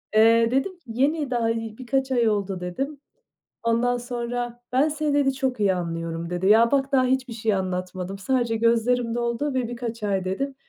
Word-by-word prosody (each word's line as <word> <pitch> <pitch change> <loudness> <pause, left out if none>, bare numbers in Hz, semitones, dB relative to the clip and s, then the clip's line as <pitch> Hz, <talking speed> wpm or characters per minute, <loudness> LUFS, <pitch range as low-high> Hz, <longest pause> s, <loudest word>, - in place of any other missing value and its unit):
Eee, 230 +1 +5
dedim 270 +9 +1
ki: - - -40
"Yeni 275 +4 0
daha, 235 -2 +1
ııı, 225 -1 -2
birkaç 265 +1 -1
ay 235 -3 +3
oldu." 200 -3 -1
dedim. 270 +12 -4 0.7
Ondan 235 +2 +2
sonra 240 0 -4
"Ben 275 +5 +3
seni" 300 -1 -1
dedi 270 -2 +2
"Çok 260 -4 -2
iyi 195 -2 +3
anlıyorum." 165 -1 -4
dedi. 180 +2 -1
Ya, 230 +2 +6
bak, 275 0 +1
daha 260 -1 +4
hiçbir 255 -1 0
şey 220 -2 0
anlatmadım, 185 0 -3
sadece 240 +1 0
gözlerim 230 +1 +2
doldu 240 +4 -1
ve 250 -3 0
"birkaç 235 -2 -5
ay" 195 -2 0
dedim. 270 +9 -2
235 Hz, 180 wpm, -24 LUFS, 210-260 Hz, 0.7 s, Ya